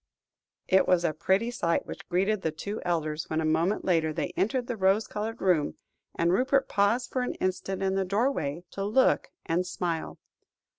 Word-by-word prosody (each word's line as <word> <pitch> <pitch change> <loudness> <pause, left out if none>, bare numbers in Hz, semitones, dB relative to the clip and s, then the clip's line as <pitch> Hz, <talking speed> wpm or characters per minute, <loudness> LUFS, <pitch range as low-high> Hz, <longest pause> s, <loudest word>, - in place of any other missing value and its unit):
It 190 0 +4
was 180 -1 +3
a 160 - +1
pretty 190 +9 +1
sight 170 -8 0
which - - -9
greeted 195 +3 +1
the 160 - 0
two 200 +7 -5
elders 155 -3 -2
when, 155 - 0
a 160 - 0
moment 165 +6 +1
later, 165 -4 +2
they 155 +1 -3
entered 245 +5 0
the 245 - -3
rose 195 +1 +2
coloured 220 +2 -4
room; 175 -6 +2 0.4
and 170 +1 +2
Rupert 265 +5 +2
paused 230 +5 +1
for 255 - 0
an 250 - -2
instant 185 +1 -2
in 190 0 +1
the 195 0 +1
doorway, 185 - -1
to 195 - -4
look 220 +6 +3 0.2
and 170 +2 +1
smile. 175 -2 -3
190 Hz, 185 wpm, -28 LUFS, 170-215 Hz, 0.4 s, It